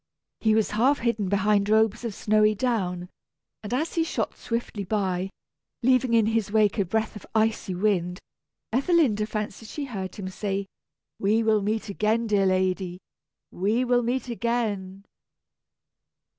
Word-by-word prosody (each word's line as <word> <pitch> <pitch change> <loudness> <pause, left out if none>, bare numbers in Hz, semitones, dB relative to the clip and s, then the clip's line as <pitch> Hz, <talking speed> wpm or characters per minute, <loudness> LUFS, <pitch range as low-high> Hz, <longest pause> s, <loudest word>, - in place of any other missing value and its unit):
He 220 -1 +3
was 220 -1 +1
half 250 +7 +3
hidden 230 -6 -1
behind 200 +1 +2
robes 220 +1 +3
of 225 -4 -4
snowy 215 0 +3
down, 190 -7 -1 0.5
and 210 - -7
as 300 +7 -1
he 330 - +2
shot 325 - -2
swiftly 230 -3 -4
by, 190 -2 -1 0.5
leaving 255 -1 +3
in 225 -2 +4
his 220 -2 0
wake 215 -1 +3
a 200 - +2
breath 220 +5 -1
of 210 - -9
icy 220 -3 +1
wind, 180 -2 0 0.5
Ethelinda 260 - +2
fancied 215 0 -5
she 295 - -4
heard 195 -7 -5
him 195 -2 -5
say, 195 +1 -3 0.5
"We 215 +3 +2
will 220 -1 +3
meet 215 +2 -1
again, 215 +3 0
dear 205 -3 +2
lady, 185 -1 0 0.5
we 215 +7 0
will 245 0 +3
meet 245 +2 -1
again!" 215 -5 -2
215 Hz, 145 wpm, -26 LUFS, 195-230 Hz, 0.5 s, in